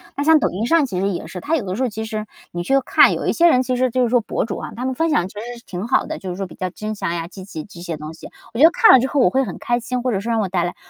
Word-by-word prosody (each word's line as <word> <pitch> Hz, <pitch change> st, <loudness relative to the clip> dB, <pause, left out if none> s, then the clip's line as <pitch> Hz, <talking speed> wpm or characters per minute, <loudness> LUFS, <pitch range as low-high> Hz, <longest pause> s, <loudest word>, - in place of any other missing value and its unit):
那 285 Hz, -, -1 dB
像 320 Hz, 0 st, +6 dB
抖 -, -, +1 dB
音 215 Hz, +6 st, -2 dB
上 330 Hz, -3 st, +4 dB
其 185 Hz, -7 st, -4 dB
实 195 Hz, +1 st, +1 dB
也 175 Hz, -, -4 dB
是， 180 Hz, -, -7 dB
它 315 Hz, -, -1 dB
有 275 Hz, -, -1 dB
的 185 Hz, 0 st, -3 dB
时 255 Hz, -, -4 dB
候 255 Hz, -, +1 dB
其 220 Hz, +1 st, -5 dB
实 215 Hz, -1 st, -5 dB, 0.2 s
你 175 Hz, -, -4 dB
去 270 Hz, +9 st, +2 dB
看， -, -, +5 dB
有 -, -, -3 dB
一 -, -, +1 dB
些 340 Hz, 0 st, +4 dB
人 255 Hz, -4 st, +3 dB
其 255 Hz, 0 st, -1 dB
实 255 Hz, +1 st, +1 dB
就 255 Hz, +1 st, +1 dB
是 240 Hz, -, +1 dB
说 245 Hz, -1 st, +3 dB
博 210 Hz, -, -2 dB
主 -, -, -5 dB
啊， -, -, -7 dB
他 250 Hz, +2 st, -4 dB
们 260 Hz, -, -1 dB
分 325 Hz, +5 st, 0 dB
享 180 Hz, -, +1 dB
其 190 Hz, -, -14 dB
实 240 Hz, +2 st, -7 dB
是 235 Hz, -, -17 dB
挺 185 Hz, +5 st, -5 dB
好 255 Hz, -, +2 dB
的， 315 Hz, -, -5 dB
就 190 Hz, -, -6 dB
是 175 Hz, -, -4 dB
说 195 Hz, 0 st, -4 dB
比 175 Hz, -, -12 dB
较 185 Hz, -1 st, -3 dB
真诚 215 Hz, -3 st, -4 dB
呀、 165 Hz, -1 st, -4 dB
积 190 Hz, +1 st, -11 dB
极 160 Hz, -5 st, -7 dB
这 175 Hz, -2 st, -14 dB
些 170 Hz, -3 st, -5 dB
东 155 Hz, +1 st, -8 dB
西。 160 Hz, -, -11 dB, 0.3 s
我 230 Hz, -, -4 dB
觉 -, -, +5 dB
得 330 Hz, -, +9 dB
看 445 Hz, -, +6 dB
了 260 Hz, -, +8 dB
之 260 Hz, -, 0 dB
后 285 Hz, -, -1 dB
我 -, -, +5 dB
会 265 Hz, 0 st, +2 dB
很 -, -, -6 dB
开 240 Hz, 0 st, -1 dB
心， 250 Hz, +1 st, -3 dB
或 255 Hz, -, 0 dB
者 195 Hz, -, 0 dB
是 230 Hz, +4 st, -5 dB
让 230 Hz, -, +1 dB
我 195 Hz, -, -1 dB
带 180 Hz, -2 st, 0 dB
来 175 Hz, +1 st, -3 dB
225 Hz, 410 characters per minute, -20 LUFS, 185-255 Hz, 0.3 s, 得